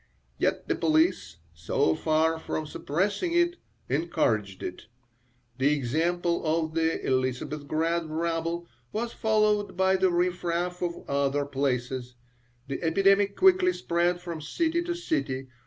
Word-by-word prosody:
Yet - - 0
the - - +2
police, 160 - +1 0.2
so 80 0 +1
far 160 - +1
from 155 -1 -3
suppressing 200 - -1
it, 345 +1 +2 0.3
encouraged 115 - 0
it. 90 - -6 0.7
The 140 +3 +4
example 170 +6 0
of 160 0 0
the 165 0 +1
Elisabethgrad 150 +5 -1
rabble 165 +1 -2 0.2
was 230 +2 -3
followed 215 -3 +1
by 190 0 +3
the 190 0 +3
riffraff 175 0 -1
of 175 -1 -4
other 140 0 +1
places. 130 -2 -2 0.5
The 135 - -4
epidemic 195 +4 +3
quickly 370 -1 +5
spread 175 - 0
from 170 -3 -6
city 330 - 0
to 345 0 -2
city. 135 - -2
165 Hz, 125 wpm, -27 LUFS, 140-190 Hz, 0.7 s, quickly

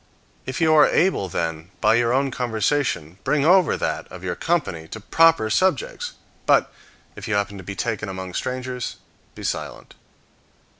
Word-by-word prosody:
If 130 -1 -3
you 160 -1 +4
are 150 -1 +7
able, 165 - +2
then, 80 0 -3
by - - +4
your 120 0 +2
own 135 +2 +1
conversation 110 - -1
bring 150 -1 +1
over 180 -1 +5
that - - -3
of 90 - -10
your 90 -1 -2
company 85 - -1
to 110 - -7
proper 165 0 +4
subjects; 485 - 0 0.3
but, - - +3 0.4
if - - -8
you 110 - 0
happen 100 0 -1
to - - -9
be 95 +2 -6
taken 105 0 -2
among 95 -1 -6
strangers, 125 +1 -3 0.4
be - - -9
silent. - - -4
120 Hz, 160 wpm, -23 LUFS, 95-150 Hz, 0.4 s, are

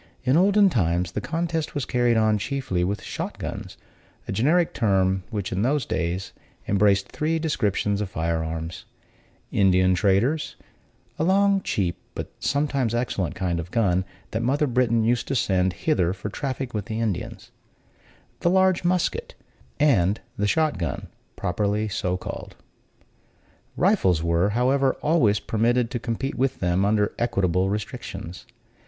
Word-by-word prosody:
In 130 +2 +3
olden 200 +4 +5
times 90 - +1
the - - -3
contest 165 0 -2
was 145 - -1
carried 120 -2 +2
on 110 -1 +3
chiefly 105 -5 -2
with 100 +3 -2
shot - - -5
guns, - - -6 0.5
a - - -3
generic 155 - +2
term 95 -3 +2
which, 105 -4 -3
in 95 - -1
those 135 +2 +1
days, 90 +1 -2 0.3
embraced 100 -1 +3
three 160 +2 -1
descriptions 105 - 0
of 100 - -3
firearms: 80 -1 -3 0.7
Indian 95 -1 +4
traders 105 - +1 0.6
(a - - +2
long, 195 +2 +3
cheap, 90 - -1 0.2
but - - -5
sometimes 140 -5 0
excellent 100 -9 -1
kind 90 -2 -1
of 85 +1 -6
gun, 95 -5 +2 0.3
that 110 - -1
mother 140 +5 +1
Britain 120 -3 +2
used 120 +1 +1
to 135 - -1
send 95 -5 +1
hither 95 - +2
for 100 +1 -6
traffic 130 +2 -4
with 105 -2 -3
the 110 -1 -4
Indians), 110 -6 -3 0.9
the 175 - +2
large 190 -1 +3
musket, 180 0 0 0.4
and 105 - +3 0.2
the 105 -4 0
shot 155 - +1
gun, 80 -6 -4 0.3
properly 105 +4 -1
so 90 -3 -1
called. - - -7 1.2
Rifles 90 -4 +3
were, 85 +3 +2
however, 135 +2 +3
always 120 -11 +3
permitted 115 +3 +1
to 120 - -2
compete 125 +4 -3
with 135 +1 0
them, 90 +2 +1
under 105 0 +2
equitable 95 -5 +1
restrictions. 95 -4 -6
110 Hz, 145 wpm, -24 LUFS, 95-135 Hz, 1.2 s, olden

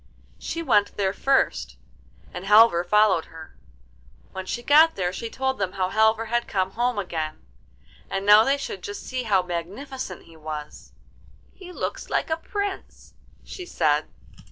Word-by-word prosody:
She 335 - -4
went 205 -9 +2
there 195 -1 0
first, 275 +5 0 0.6
and 180 - -6
Halvor 210 -4 +6
followed 195 -2 +3
her. 160 -1 -13 0.8
When 190 0 -7
she 240 - -4
got 310 +5 +6
there 180 -1 -2
she 230 +4 -5
told 265 +1 -2
them 195 -2 -2
how 185 -2 -1
Halvor 220 +2 +2
had 235 +1 -1
come 190 -1 -1
home 240 +2 -1
again, 160 - -4 0.6
and 195 0 -3
now 210 +1 +8
they 275 +4 +2
should 200 -8 -6
just 205 +3 -7
see 255 -1 -4
how 200 -6 +2
magnificent 190 - -6
he 165 - -17
was. 155 -1 -8 0.6
'He 365 -2 -12
looks - - -5
like - - -1
a 320 - +1
prince,' 405 +1 -6 0.3
she 370 - -8
said. - - +1
210 Hz, 155 wpm, -24 LUFS, 185-260 Hz, 0.8 s, now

